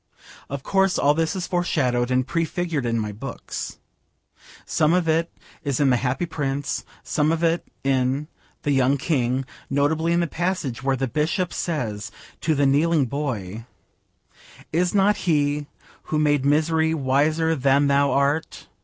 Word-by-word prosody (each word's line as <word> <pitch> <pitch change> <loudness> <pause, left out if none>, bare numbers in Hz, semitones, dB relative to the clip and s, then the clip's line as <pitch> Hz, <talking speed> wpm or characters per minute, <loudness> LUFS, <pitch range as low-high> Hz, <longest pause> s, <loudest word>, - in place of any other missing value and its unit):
Of 140 -1 -5
course 195 -1 +2
all 145 - +4
this 160 +3 0
is 185 -1 -2
foreshadowed 130 -9 0
and 130 0 +2
prefigured 165 -3 -1
in 115 0 0
my 105 -2 -2
books. 105 - -6 0.9
Some 155 +1 +2
of 180 -2 +1
it 165 +1 +1 0.3
is 140 -4 -1
in 140 -2 +4
The 125 - +4
Happy 130 +7 -1
Prince, 145 -3 -2 0.2
some 150 +1 +1
of 165 +1 -1
it 165 +1 +1 0.2
in 135 +2 +1 0.4
The 145 - +1
Young 135 0 +3
King, 130 -3 0 0.2
notably 155 +4 +1
in 170 - +3
the 170 - +2
passage 170 -7 -2
where 135 0 +1
the 135 +1 -1
bishop 160 - -1
says 115 - -3 0.3
to 160 -1 +1
the 145 0 +2
kneeling 150 +2 +3
boy, 115 -6 -4 1.1
'Is 180 +4 +1
not 205 +1 +4
He 145 -3 0 0.4
who 155 - -1
made 145 -2 +2
misery 160 +2 +2
wiser 155 +4 +2
than 140 0 +3
thou 140 0 +3
art'? 140 +3 0
145 Hz, 155 wpm, -23 LUFS, 135-165 Hz, 1.1 s, all